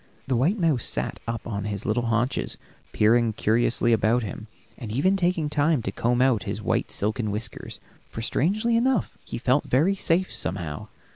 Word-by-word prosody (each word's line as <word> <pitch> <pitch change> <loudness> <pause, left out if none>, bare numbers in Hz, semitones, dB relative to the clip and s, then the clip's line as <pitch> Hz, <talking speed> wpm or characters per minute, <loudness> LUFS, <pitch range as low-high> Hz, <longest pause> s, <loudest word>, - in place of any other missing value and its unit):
The 135 - 0
white 155 - +2
mouse 160 - +1
sat - - -3
up 115 0 -4
on 100 -4 -4
his 100 -1 -3
little 120 +2 0
haunches, 115 +3 0 0.3
peering 115 +1 +3
curiously 120 +2 +2
about 115 +3 +2
him, 110 +2 -7 0.3
and 115 -5 -7
even 150 - +2
taking 175 -4 +1
time 150 -3 +1
to - - -2
comb 120 +1 +1
out 130 -6 +3
his - - -4
white - - -1
silken 110 +2 -1
whiskers, 105 +2 -5 0.3
for 115 - -6
strangely 215 - +1
enough 245 -1 +1
he - - -6
felt 130 +4 +1
very 155 +10 +3
safe, 185 -1 0
somehow. 80 -3 -4
120 Hz, 170 wpm, -25 LUFS, 110-160 Hz, 0.3 s, peering